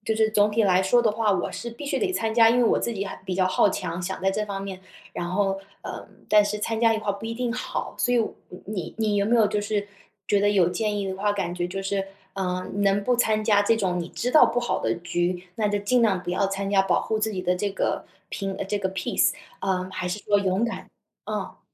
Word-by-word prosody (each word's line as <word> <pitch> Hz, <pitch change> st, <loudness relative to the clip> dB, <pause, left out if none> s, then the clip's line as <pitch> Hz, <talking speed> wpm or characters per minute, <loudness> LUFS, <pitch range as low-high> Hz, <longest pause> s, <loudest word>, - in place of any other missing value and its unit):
就 220 Hz, -, 0 dB
是 220 Hz, 0 st, +2 dB
总 210 Hz, -1 st, +3 dB
体 220 Hz, +2 st, +2 dB
来 185 Hz, -1 st, +4 dB
说 240 Hz, +6 st, +4 dB
的 220 Hz, -, +3 dB
话， 215 Hz, -1 st, +1 dB
我 180 Hz, -, -1 dB
是 235 Hz, -, -5 dB
必 260 Hz, +6 st, -9 dB
须 280 Hz, -, -1 dB
得 390 Hz, -3 st, 0 dB
参 225 Hz, -9 st, -1 dB
加， 225 Hz, -1 st, +7 dB
因 235 Hz, -, +3 dB
为 245 Hz, -, +4 dB
我 -, -, +3 dB
自 235 Hz, -, -2 dB
己 200 Hz, -2 st, -3 dB
还 -, -, -6 dB
比 185 Hz, -, -2 dB
较 185 Hz, 0 st, +2 dB
好 185 Hz, -, +3 dB
强， 180 Hz, -2 st, -3 dB
想 185 Hz, +2 st, -4 dB
在 195 Hz, -, +3 dB
这 210 Hz, +2 st, -1 dB
方 195 Hz, -1 st, -5 dB
面 190 Hz, -1 st, -6 dB, 0.3 s
然 175 Hz, -, -4 dB
后， 195 Hz, +1 st, 0 dB, 0.2 s
呃， -, -, -7 dB, 0.2 s
但 210 Hz, -1 st, +6 dB
是 210 Hz, +1 st, -2 dB
参 225 Hz, +1 st, -2 dB
加 225 Hz, -1 st, +4 dB
一 -, -, -1 dB
块 210 Hz, -2 st, -2 dB
不 200 Hz, +3 st, -7 dB
一 230 Hz, -, -3 dB
定 245 Hz, -1 st, -1 dB
好。 250 Hz, -, -4 dB
所 245 Hz, -, +2 dB
以， 240 Hz, -, +4 dB
我 225 Hz, -, 0 dB, 0.3 s
你 195 Hz, -5 st, -5 dB
你 220 Hz, -1 st, 0 dB
你 205 Hz, -, +1 dB
有 200 Hz, -, +2 dB
没 235 Hz, +2 st, +3 dB
有 220 Hz, -2 st, +5 dB
就 210 Hz, -, 0 dB
是 205 Hz, -1 st, -2 dB, 0.4 s
觉 205 Hz, -, +4 dB
得 205 Hz, -, +3 dB
有 185 Hz, -4 st, +4 dB
建 210 Hz, +3 st, -1 dB
议 195 Hz, -1 st, -2 dB
的 190 Hz, -, -4 dB
话， 205 Hz, +1 st, +1 dB
感 195 Hz, -4 st, -2 dB
觉 175 Hz, 0 st, -1 dB
就 195 Hz, +1 st, -4 dB
是 195 Hz, 0 st, -1 dB, 0.3 s
呃， 185 Hz, -1 st, -2 dB
能 200 Hz, 0 st, +2 dB
不 250 Hz, -, +3 dB
参 215 Hz, -2 st, +2 dB
加 205 Hz, -2 st, +4 dB
这 225 Hz, +2 st, +3 dB
种 185 Hz, -4 st, 0 dB
你 170 Hz, -, -5 dB
知 250 Hz, -, -2 dB
道 310 Hz, -, +7 dB
不 245 Hz, -, 0 dB
好 240 Hz, -, -1 dB
的 -, -, 0 dB
局， 175 Hz, +1 st, -2 dB
那 215 Hz, -2 st, +1 dB
就 205 Hz, 0 st, 0 dB
尽 245 Hz, +5 st, +2 dB
量 195 Hz, -5 st, +2 dB
不 175 Hz, -, -4 dB
要 195 Hz, +2 st, +1 dB
参 195 Hz, 0 st, -3 dB
加， 195 Hz, -1 st, +5 dB
保 195 Hz, -, +1 dB
护 220 Hz, -, -1 dB
自 220 Hz, 0 st, 0 dB
己 185 Hz, -2 st, -3 dB
的 180 Hz, -, +1 dB
这 205 Hz, +2 st, -1 dB
个 -, -, -1 dB, 0.3 s
平 195 Hz, -2 st, -3 dB
呃， -, -, -4 dB
这 205 Hz, +1 st, -2 dB
个 190 Hz, -1 st, -1 dB
peace， 190 Hz, -, +1 dB, 0.3 s
呃， 185 Hz, -1 st, -1 dB
还 180 Hz, -1 st, -3 dB
是 180 Hz, -, -2 dB
说 205 Hz, 0 st, +2 dB
勇 195 Hz, +2 st, +1 dB
敢？ 235 Hz, -, -5 dB, 0.4 s
嗯。 -, -, -4 dB
205 Hz, 305 characters per minute, -25 LUFS, 190-220 Hz, 0.4 s, 加